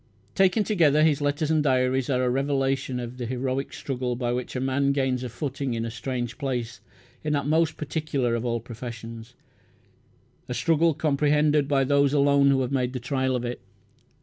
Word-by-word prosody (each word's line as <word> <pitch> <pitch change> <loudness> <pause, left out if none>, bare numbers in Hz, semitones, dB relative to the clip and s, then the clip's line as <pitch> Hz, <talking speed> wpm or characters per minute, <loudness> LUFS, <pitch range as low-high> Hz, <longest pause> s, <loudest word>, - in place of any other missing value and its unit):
Taken 195 +3 +3
together 155 -8 +3
his 150 -2 +3
letters 145 +2 0
and 155 -1 +3
diaries 130 -2 +1
are 130 -2 +1
a 125 - +2
revelation 135 -1 0
of 120 +1 -6
the 120 -2 -4
heroic 130 +2 -2
struggle 125 -2 -3
by 120 0 -1
which 125 +1 -4
a - - -1
man 135 +2 +1
gains 130 -2 0
a 125 - -4
footing 135 0 -3
in 115 0 -2
a 115 - -4
strange 120 0 -4
place 125 -4 -3 0.4
in 150 -1 0
that 140 -2 0
most 160 +1 +1
particular 145 -5 -1
of 115 0 -1
all 120 -1 -1
professions, 115 0 -9 1.1
a 125 - -2
struggle 165 +1 +2
comprehended 150 0 +2
by 140 -2 +2
those 140 +1 +3
alone 140 -1 +4
who 135 -1 +3
have 130 0 -2
made 125 -2 0
the 130 - -3
trial 130 +1 -1
of 125 -1 -2
it. 120 0 -5
135 Hz, 185 wpm, -25 LUFS, 125-145 Hz, 1.1 s, alone